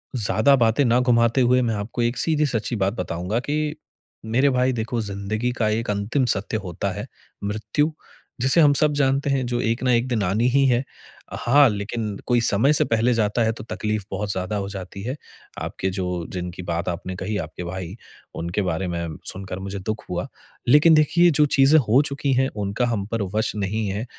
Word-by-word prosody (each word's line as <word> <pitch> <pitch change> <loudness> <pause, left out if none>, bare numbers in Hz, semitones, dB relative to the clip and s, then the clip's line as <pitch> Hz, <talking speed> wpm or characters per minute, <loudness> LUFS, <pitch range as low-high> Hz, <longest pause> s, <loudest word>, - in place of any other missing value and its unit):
ज़्यादा 115 +4 +3
बातें 120 +2 +3
ना 120 +1 +3
घुमाते 120 0 +3
हुए 125 +1 +4
मैं 115 -3 0
आपको 105 +4 -4
एक 120 +1 0
सीधी-सच्ची 145 -7 0
बात 100 -1 0
बताऊँगा 90 0 -2
कि 150 +3 -2 0.5
मेरे 125 +6 +2
भाई 130 0 +1
देखो, 115 0 -2
ज़िंदगी 105 +3 -3
का 115 -3 0
एक 110 +2 -1
अंतिम 105 +7 0
सत्य 105 +3 -3
होता 90 -3 -3
है, - - -6 0.4
मृत्यु, 110 +9 -1 0.5
जिसे 135 +7 +4
हम 145 -1 +6
सब 150 +1 +3
जानते 140 0 +1
हैं 135 -2 +1
जो 120 0 -1
एक 115 +2 -1
ना 130 - +2
एक 120 +2 +2
दिन 120 -5 0
आनी 105 +6 +1
ही 140 +2 +3
है। 125 0 +2 0.6
हाँ, 140 +4 +5
लेकिन 105 0 -3
कोई 120 -1 +3
समय 115 +6 +3
से - - +3
पहले 115 +2 +2
जाता 110 0 +1
है 110 - +2
तो 110 - -9
तकलीफ़ 110 -2 -3
बहुत 100 +1 -2
ज़्यादा 95 +2 -3
हो 100 -1 -2
जाती 95 -1 -7
है। 125 +5 -3 0.5
आपके 95 - -3
जो 90 -2 -3
जिनकी 90 -1 -5
बात 85 +1 -2
आपने 90 +2 -5
कही, 105 +3 -3
आपके 80 +1 -6
भाई, 90 +1 -6 0.4
उनके 85 +5 -2
बारे 90 0 -2
में 85 -2 -4
सुनकर 95 0 -6
मुझे 100 +1 -5
दुःख 110 +3 -4
हुआ। 90 0 -3 0.4
लेकिन 150 +6 +6
देखिए 165 +3 +5
जो 150 0 +4
चीज़ें 140 +1 +5
हो 125 0 +4
चुकी 140 0 -2
हैं, 130 +1 +2
उनका 105 +3 -1
हम 110 -4 -1
पर 115 - -1
वश 110 +1 +1
नहीं 105 +1 -2
है। 100 +4 -3
110 Hz, 195 wpm, -23 LUFS, 100-125 Hz, 0.6 s, हम